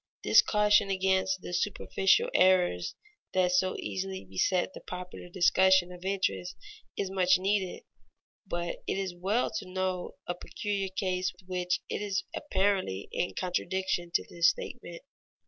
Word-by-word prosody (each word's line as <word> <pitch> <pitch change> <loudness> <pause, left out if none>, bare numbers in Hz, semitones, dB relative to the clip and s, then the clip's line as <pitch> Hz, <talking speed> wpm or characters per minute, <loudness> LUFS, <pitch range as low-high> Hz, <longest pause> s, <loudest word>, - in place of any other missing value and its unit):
This - - +7
caution 210 -1 +3
against 190 0 +1
the 175 - -7
superficial 210 - +2
errors 180 - +3 0.4
that 180 -1 +3
so 185 +1 +2
easily 95 -1 -4
beset 180 - 0
the - - -10
popular 180 0 -8
discussion 185 0 +4
of 180 0 -11
interest 185 - -1 0.4
is 190 -1 -2
much 185 -1 +4
needed, 190 0 -1 0.6
but 175 -1 -3
it - - -1
is 190 -2 -2
well 195 +7 0
to 185 - -10
note 185 -1 -2
a 175 - -2
peculiar 195 +2 -3
case 185 -1 -1
which 180 -1 -1
is 200 -2 -2
apparently 190 - 0
in 180 - -2
contradiction 185 -1 -1
to - - +2
this 170 -1 +4
statement. - - -6
185 Hz, 135 wpm, -29 LUFS, 175-195 Hz, 0.6 s, This